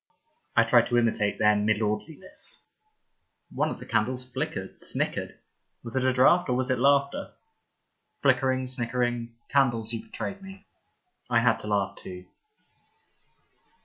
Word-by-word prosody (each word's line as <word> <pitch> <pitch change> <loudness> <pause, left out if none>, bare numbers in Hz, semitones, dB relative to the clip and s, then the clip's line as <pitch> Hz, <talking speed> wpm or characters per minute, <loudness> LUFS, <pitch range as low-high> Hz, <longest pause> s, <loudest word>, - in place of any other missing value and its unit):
I 115 - +6
tried 115 0 +4
to 120 - +1
imitate 110 -3 +1
their 105 0 +4
milordliness. 110 - +1 0.9
One - - 0
of - - -6
the - - -10
candles 125 +3 -1
flickered, 130 +1 -5
snickered. - - -3 0.5
Was 115 0 -8
it 130 - +1
a 130 - +3
draught 130 +7 +4
or 125 - +1
was 130 +1 0
it 130 - 0
laughter? 140 +1 +1 0.9
Flickering, 130 -1 +2
snickering 120 -1 -2
— - - -46
candles, 120 -5 +1
you 115 - -3
betrayed 200 0 -6
me. 195 0 -12 0.6
I 120 -1 +3
had 115 -1 +2
to - - -5
laugh 100 -2 0
too. 90 0 -9
120 Hz, 140 wpm, -27 LUFS, 115-130 Hz, 0.9 s, I